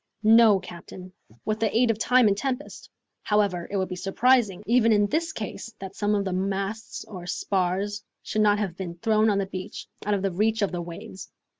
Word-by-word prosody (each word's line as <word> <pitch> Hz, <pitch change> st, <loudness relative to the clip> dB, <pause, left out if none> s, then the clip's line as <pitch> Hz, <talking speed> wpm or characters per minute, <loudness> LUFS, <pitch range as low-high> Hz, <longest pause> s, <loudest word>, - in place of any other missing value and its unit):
"No, 220 Hz, -2 st, +6 dB
captain, 180 Hz, 0 st, -11 dB, 0.3 s
with 215 Hz, 0 st, -1 dB
the 220 Hz, 0 st, +1 dB
aid 240 Hz, -1 st, +4 dB
of 220 Hz, -, -4 dB
time 250 Hz, 0 st, +4 dB
and 200 Hz, -, +3 dB
tempest. 265 Hz, +5 st, -4 dB, 0.3 s
However, 200 Hz, -5 st, +1 dB
it 200 Hz, -, -2 dB
would 190 Hz, -1 st, 0 dB
be 185 Hz, -, -4 dB
surprising, 210 Hz, +2 st, +2 dB
even 230 Hz, 0 st, +4 dB
in 205 Hz, -1 st, +4 dB
this 320 Hz, +8 st, -1 dB
case, 220 Hz, -3 st, -6 dB
that 195 Hz, 0 st, -8 dB
some 210 Hz, 0 st, +1 dB
of 200 Hz, -1 st, 0 dB
the 190 Hz, -, -2 dB
masts 195 Hz, +3 st, -3 dB
or 180 Hz, -4 st, -9 dB
spars 195 Hz, +3 st, -1 dB, 0.2 s
should 215 Hz, -, -1 dB
not 205 Hz, -1 st, +4 dB
have 195 Hz, -5 st, -2 dB
been 175 Hz, -2 st, -6 dB
thrown 215 Hz, +4 st, +2 dB
on 205 Hz, -, +2 dB
the 200 Hz, -, 0 dB
beach, 190 Hz, -1 st, -7 dB, 0.2 s
out 210 Hz, 0 st, +1 dB
of 195 Hz, -2 st, -2 dB
reach 220 Hz, 0 st, +2 dB
of 200 Hz, -, 0 dB
the 175 Hz, -1 st, -3 dB
waves." 190 Hz, +4 st, -9 dB
205 Hz, 200 wpm, -26 LUFS, 190-220 Hz, 0.3 s, No